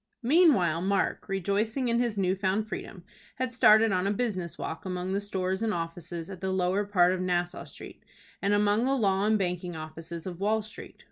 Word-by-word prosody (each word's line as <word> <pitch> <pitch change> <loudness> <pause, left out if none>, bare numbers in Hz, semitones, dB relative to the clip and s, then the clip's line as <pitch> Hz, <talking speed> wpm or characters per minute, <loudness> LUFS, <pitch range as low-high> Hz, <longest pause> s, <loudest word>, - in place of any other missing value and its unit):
Meanwhile 235 - +4
Mark, 195 +2 0
rejoicing 205 +7 0
in 235 0 +2
his 235 -4 0
new 190 -1 +1
found 195 +3 0
freedom, 190 -4 -7 0.3
had 255 -1 -3
started 220 -2 +6
on 185 0 +1
a - - +1
business 195 -6 -2
walk 160 - -5
among 185 0 -3
the 200 - 0
stores 190 -1 -2
and 220 -3 0
offices 165 0 -5
at 190 -2 -9
the 190 0 -1
lower 190 +2 +1
part 180 -3 +3
of 185 - -2
Nassau 175 -1 -1
Street, - - -11 0.4
and 200 - +1
among 205 +3 +2
the 270 +1 +2
law 200 -3 +2
and 215 0 +3
banking 180 -2 -2
offices 160 +1 -7
of 180 -2 -6
Wall 215 +2 +1
Street. 215 +1 -10
195 Hz, 195 wpm, -28 LUFS, 180-215 Hz, 0.4 s, started